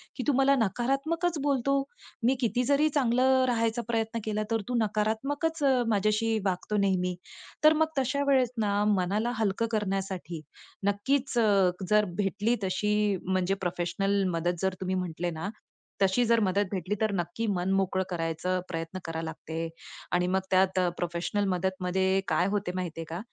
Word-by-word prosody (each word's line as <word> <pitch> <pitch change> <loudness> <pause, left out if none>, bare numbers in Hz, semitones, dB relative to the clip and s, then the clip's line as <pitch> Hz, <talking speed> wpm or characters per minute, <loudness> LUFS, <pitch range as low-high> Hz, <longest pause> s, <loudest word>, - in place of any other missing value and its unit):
की - - -3
तू 290 - +4
मला 275 +1 +5
नकारात्मकच 275 - 0
बोलतो. 275 -1 +2 0.5
मी 260 +3 +4
किती 245 +1 +1
जरी 285 +3 +3
चांगलं 260 -1 +3
राहायचा 230 -1 +1
प्रयत्न 225 0 -1
केला 215 0 -1
तर 225 -1 +1
तू 250 - -1
नकारात्मकच 270 +10 -1
अ, 275 -1 +5
माझ्याशी 215 +1 +1
वागतो 190 +2 -1
नेहमी. 180 -2 0 0.5
तर 310 +1 +8
मग 315 - +4
तशा 270 +2 0
वेळेस 260 -4 +3
ना 205 -1 +1
मनाला 200 +6 0
हलकं 220 +1 +1
करण्यासाठी, 195 -5 -2 0.5
नक्कीच 250 +6 0
अ, 200 -5 +4 0.2
जर 210 0 +4 0.2
भेटली 205 +4 +1
तशी 210 +2 0 0.3
म्हणजे 185 0 +1
प्रोफेशनल 195 +3 0
मदत 175 +1 -1
जर 190 -1 +1
तुम्ही 185 0 -1
म्हटले 175 -1 -2
ना, 200 - -2 0.5
तशी 195 +5 +3
जर 230 0 +4
मदत 200 0 +2
भेटली 190 +1 -2
तर 215 -1 +2
नक्की 175 +5 -2
मन 190 -2 0
मोकळं 190 -1 +1
करायचं 170 +1 -1
प्रयत्न 165 +2 -4
करावं 165 0 -4
लागते 160 +1 -5 0.5
आणि 180 0 +2
मग 190 +1 +2
त्यात 190 0 +3 0.2
प्रोफेशनल 175 +4 -1
मदतमध्ये 190 +1 0
काय 180 - +2
होते 200 -3 -1
माहिती 175 -3 -4
आहे - - -6
का? 165 +2 -4
200 Hz, 155 wpm, -28 LUFS, 185-235 Hz, 0.5 s, तर